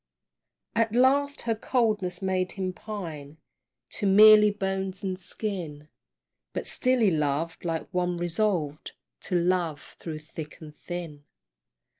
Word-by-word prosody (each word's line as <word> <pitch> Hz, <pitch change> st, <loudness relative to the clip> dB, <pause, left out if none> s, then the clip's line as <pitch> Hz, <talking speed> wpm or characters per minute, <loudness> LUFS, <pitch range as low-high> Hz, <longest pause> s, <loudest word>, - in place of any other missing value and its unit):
At 225 Hz, 0 st, +1 dB
last 280 Hz, +3 st, +3 dB
her 230 Hz, -, 0 dB
coldness 210 Hz, -6 st, 0 dB
made 185 Hz, -1 st, 0 dB
him 185 Hz, -1 st, -3 dB
pine 160 Hz, -9 st, -7 dB, 0.6 s
To 205 Hz, -, +1 dB
merely 210 Hz, +2 st, +8 dB
bones 195 Hz, -2 st, -3 dB
and 190 Hz, -1 st, -1 dB
skin, 175 Hz, -6 st, -4 dB, 0.6 s
But -, -, -3 dB
still 255 Hz, -1 st, +2 dB
he 210 Hz, -4 st, +4 dB
loved 155 Hz, +1 st, -1 dB
like 165 Hz, -2 st, -2 dB
one 180 Hz, -1 st, 0 dB
resolved 175 Hz, -4 st, -1 dB, 0.3 s
To 180 Hz, -2 st, -1 dB
love 170 Hz, -3 st, -1 dB
through 160 Hz, -2 st, -5 dB
thick 155 Hz, 0 st, -9 dB
and 150 Hz, -2 st, -11 dB
thin. 165 Hz, -5 st, -7 dB
185 Hz, 125 wpm, -27 LUFS, 160-210 Hz, 0.6 s, merely